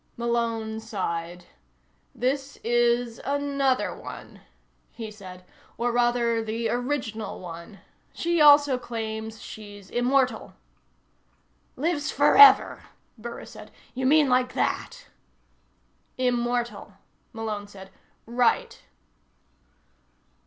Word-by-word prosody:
Malone 230 Hz, -2 st, -1 dB
sighed. 175 Hz, -5 st, -4 dB, 0.7 s
"This 270 Hz, +3 st, -2 dB
is 240 Hz, 0 st, +1 dB
another 280 Hz, -2 st, 0 dB
one," -, -, -10 dB, 0.5 s
he 225 Hz, -2 st, -8 dB
said. 185 Hz, -3 st, -12 dB, 0.3 s
"Or, 240 Hz, +1 st, 0 dB
rather, 240 Hz, -1 st, +1 dB
the 225 Hz, +1 st, -2 dB
original 245 Hz, -4 st, -3 dB
one. 170 Hz, +3 st, -10 dB, 0.3 s
She 340 Hz, -1 st, 0 dB
also 290 Hz, -3 st, +6 dB
claims 220 Hz, -2 st, -5 dB
she's 205 Hz, -2 st, -11 dB
immortal." 255 Hz, +2 st, 0 dB, 1.2 s
"Lives 300 Hz, 0 st, -1 dB
forever?" 425 Hz, 0 st, +6 dB, 0.3 s
Burris 235 Hz, +1 st, -9 dB
said. -, -, -12 dB, 0.2 s
"You 260 Hz, 0 st, -1 dB
mean 300 Hz, +1 st, +5 dB
like 250 Hz, 0 st, +1 dB
that?" -, -, -2 dB, 1.1 s
"Immortal," 240 Hz, -4 st, -1 dB, 0.4 s
Malone 215 Hz, -2 st, -5 dB
said. 190 Hz, -1 st, -13 dB, 0.3 s
"Right." 240 Hz, 0 st, 0 dB
235 Hz, 90 wpm, -25 LUFS, 220-255 Hz, 1.2 s, also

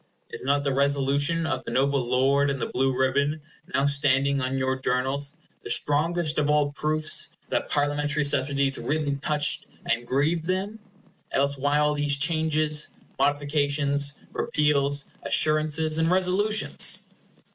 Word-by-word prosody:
Is -, -, -7 dB
not 140 Hz, +2 st, +1 dB
the 140 Hz, -1 st, -1 dB
Resolution 140 Hz, +4 st, +1 dB
of -, -, -2 dB
the -, -, -7 dB
noble 135 Hz, 0 st, +1 dB
lord 135 Hz, +3 st, +2 dB
in 140 Hz, -, -2 dB
the -, -, -3 dB
blue 135 Hz, +1 st, 0 dB
ribbon, 140 Hz, +3 st, 0 dB, 0.3 s
now 140 Hz, -, +1 dB
standing 140 Hz, -1 st, +2 dB
on 130 Hz, +1 st, -2 dB
your 130 Hz, 0 st, 0 dB
Journals, 135 Hz, +3 st, -1 dB, 0.3 s
the -, -, -8 dB
strongest 155 Hz, +2 st, +2 dB
of 150 Hz, 0 st, 0 dB
all 150 Hz, -1 st, +2 dB
proofs 155 Hz, +2 st, +1 dB, 0.2 s
that -, -, -2 dB
Parliamentary 145 Hz, +1 st, 0 dB
subsidies 140 Hz, -1 st, +1 dB
really 145 Hz, +3 st, -2 dB
touched 150 Hz, +1 st, 0 dB, 0.2 s
and 120 Hz, +1 st, -1 dB
grieved 155 Hz, +6 st, 0 dB
them? 195 Hz, +4 st, -2 dB, 0.5 s
Else 140 Hz, +1 st, +1 dB
why 145 Hz, +2 st, +1 dB
all 150 Hz, 0 st, +2 dB
these 145 Hz, -1 st, +1 dB
changes, 155 Hz, 0 st, +1 dB, 0.3 s
modifications, 145 Hz, 0 st, 0 dB, 0.2 s
repeals, 145 Hz, -1 st, +1 dB, 0.2 s
assurances, 155 Hz, +2 st, +1 dB
and 160 Hz, 0 st, +2 dB
resolutions? 190 Hz, +4 st, +2 dB
145 Hz, 135 wpm, -25 LUFS, 140-155 Hz, 0.5 s, lord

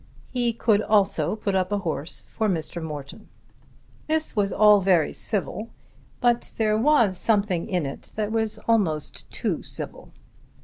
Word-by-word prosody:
He 245 Hz, -2 st, +1 dB
could 220 Hz, -2 st, +2 dB
also 210 Hz, -1 st, +2 dB
put 205 Hz, -2 st, -2 dB
up 185 Hz, 0 st, 0 dB
a 205 Hz, -, +1 dB
horse 165 Hz, -4 st, -3 dB
for 220 Hz, -2 st, -1 dB
Mr. 170 Hz, -1 st, -2 dB
Morton. 150 Hz, +5 st, -8 dB, 0.8 s
This 315 Hz, -2 st, 0 dB
was 200 Hz, -2 st, +1 dB
all 210 Hz, -1 st, +6 dB
very 180 Hz, -5 st, +3 dB
civil, 215 Hz, +2 st, -2 dB, 0.5 s
but 240 Hz, -1 st, +2 dB
there 215 Hz, -1 st, +2 dB
was 225 Hz, -6 st, +3 dB
something 200 Hz, -6 st, +1 dB
in 180 Hz, -5 st, 0 dB
it 135 Hz, -, -7 dB
that 215 Hz, -1 st, -2 dB
was 220 Hz, -1 st, -1 dB
almost 185 Hz, -10 st, 0 dB
too -, -, -2 dB
civil. -, -, -8 dB
210 Hz, 145 wpm, -25 LUFS, 180-225 Hz, 0.8 s, all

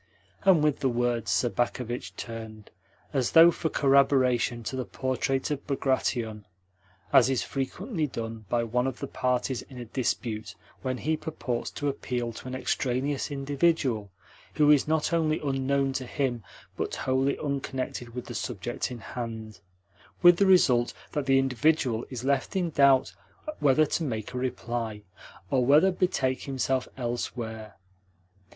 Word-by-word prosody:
And, 180 Hz, -6 st, +6 dB
with 150 Hz, -2 st, +2 dB
the 135 Hz, -, +1 dB
words, 120 Hz, -2 st, 0 dB
Sobakevitch 120 Hz, 0 st, -1 dB
turned, 110 Hz, -2 st, -8 dB, 0.4 s
as 130 Hz, -4 st, 0 dB
though 165 Hz, +1 st, +9 dB
for 165 Hz, -1 st, -2 dB
corroboration, 135 Hz, -4 st, +3 dB
to 120 Hz, -, -4 dB
the 130 Hz, -, -2 dB
portrait 130 Hz, +2 st, -2 dB
of 145 Hz, -2 st, -4 dB
Bagration, 125 Hz, -6 st, -1 dB, 0.7 s
as 135 Hz, -2 st, +7 dB
is 130 Hz, -2 st, +1 dB
frequently 160 Hz, -, -3 dB
done 115 Hz, -3 st, -6 dB
by 120 Hz, -1 st, +1 dB
one 125 Hz, +3 st, 0 dB
of 130 Hz, -, -3 dB
the -, -, -4 dB
parties 125 Hz, -1 st, -1 dB
in 130 Hz, -, -13 dB
a 120 Hz, -, -6 dB
dispute 115 Hz, -2 st, -3 dB, 0.3 s
when 130 Hz, -1 st, -2 dB
he 155 Hz, +5 st, 0 dB
purports 155 Hz, -6 st, -4 dB
to 145 Hz, -, -1 dB
appeal 125 Hz, -4 st, -2 dB
to 120 Hz, -, -9 dB
an 130 Hz, -, -4 dB
extraneous 130 Hz, +2 st, -1 dB
individual 140 Hz, -6 st, 0 dB, 0.5 s
who 150 Hz, -1 st, +5 dB
is 145 Hz, -1 st, +4 dB
not 160 Hz, +1 st, +1 dB
only 160 Hz, -2 st, +2 dB
unknown 135 Hz, -1 st, 0 dB
to 130 Hz, -1 st, -3 dB
him, 130 Hz, -4 st, -1 dB, 0.3 s
but -, -, -3 dB
wholly 135 Hz, +1 st, 0 dB
unconnected 130 Hz, -4 st, -4 dB
with 125 Hz, -, -5 dB
the 120 Hz, -, -7 dB
subject 115 Hz, 0 st, -3 dB
in 125 Hz, -, -6 dB
hand; 110 Hz, -4 st, -6 dB, 0.6 s
with 175 Hz, -1 st, +8 dB
the 200 Hz, -, +4 dB
result 125 Hz, -10 st, +4 dB, 0.2 s
that 145 Hz, -2 st, -2 dB
the 135 Hz, 0 st, +5 dB
individual 130 Hz, -2 st, +1 dB
is 125 Hz, -2 st, -6 dB
left 135 Hz, +3 st, 0 dB
in 180 Hz, -3 st, 0 dB
doubt 140 Hz, -3 st, +4 dB, 0.5 s
whether 145 Hz, +2 st, +4 dB
to 160 Hz, -, -1 dB
make 110 Hz, -5 st, -4 dB
a -, -, -4 dB
reply, 115 Hz, -4 st, -3 dB, 0.5 s
or 130 Hz, -2 st, +3 dB
whether 150 Hz, +9 st, +5 dB
to 180 Hz, -, -10 dB
betake 130 Hz, -8 st, 0 dB
himself 130 Hz, -1 st, -1 dB
elsewhere. 115 Hz, -3 st, -4 dB
130 Hz, 150 wpm, -27 LUFS, 120-140 Hz, 0.7 s, though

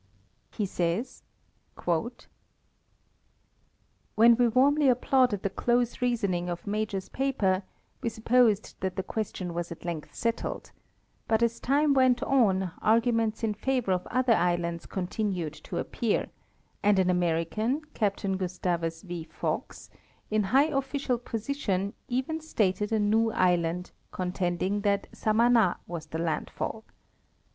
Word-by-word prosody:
He 210 Hz, -, -2 dB
says: 185 Hz, +8 st, -2 dB, 0.6 s
When 175 Hz, +6 st, +1 dB, 2.3 s
we 245 Hz, +1 st, +3 dB
warmly 275 Hz, +4 st, +4 dB
applauded 250 Hz, -4 st, +2 dB
the 200 Hz, -, +1 dB
close 240 Hz, +1 st, 0 dB
reasoning 200 Hz, -8 st, 0 dB
of 175 Hz, -1 st, -5 dB
Major's 205 Hz, -2 st, -2 dB
paper 215 Hz, -9 st, +1 dB, 0.4 s
we 235 Hz, -, 0 dB
supposed 225 Hz, -1 st, +2 dB
that 190 Hz, -1 st, -2 dB
the 190 Hz, -, -2 dB
question 190 Hz, -4 st, -4 dB
was 170 Hz, 0 st, -4 dB
at 170 Hz, -, -9 dB
length 165 Hz, -3 st, -5 dB
settled; 230 Hz, 0 st, -3 dB, 0.6 s
but 220 Hz, +1 st, +2 dB
as 235 Hz, 0 st, 0 dB
time 285 Hz, +2 st, +3 dB
went 260 Hz, -1 st, +3 dB
on 195 Hz, -10 st, +2 dB
arguments 225 Hz, 0 st, +2 dB
in 220 Hz, -2 st, +1 dB
favor 250 Hz, -1 st, -1 dB
of 180 Hz, -1 st, 0 dB
other 255 Hz, -1 st, +2 dB
islands 170 Hz, -3 st, 0 dB
continued 185 Hz, -4 st, -2 dB
to -, -, -5 dB
appear, 230 Hz, -3 st, -1 dB, 0.5 s
and 205 Hz, -1 st, +4 dB
an 185 Hz, -1 st, +3 dB
Ameri 170 Hz, -2 st, +1 dB
can* 235 Hz, -, -1 dB, 2.5 s
in 215 Hz, 0 st, +2 dB
high 260 Hz, +8 st, +5 dB
official 275 Hz, -4 st, -1 dB
position 220 Hz, -5 st, -2 dB
even 265 Hz, +6 st, -2 dB
started 210 Hz, -8 st, 0 dB
a 220 Hz, -, +2 dB
new 220 Hz, +2 st, +2 dB
island, 180 Hz, -1 st, +1 dB, 0.2 s
contending 185 Hz, +2 st, -1 dB
that 200 Hz, -1 st, +1 dB
Samana 225 Hz, -3 st, +3 dB
was 165 Hz, -2 st, -6 dB
the 160 Hz, -, -5 dB
landfall. 165 Hz, -1 st, -3 dB
215 Hz, 120 wpm, -28 LUFS, 180-245 Hz, 2.5 s, high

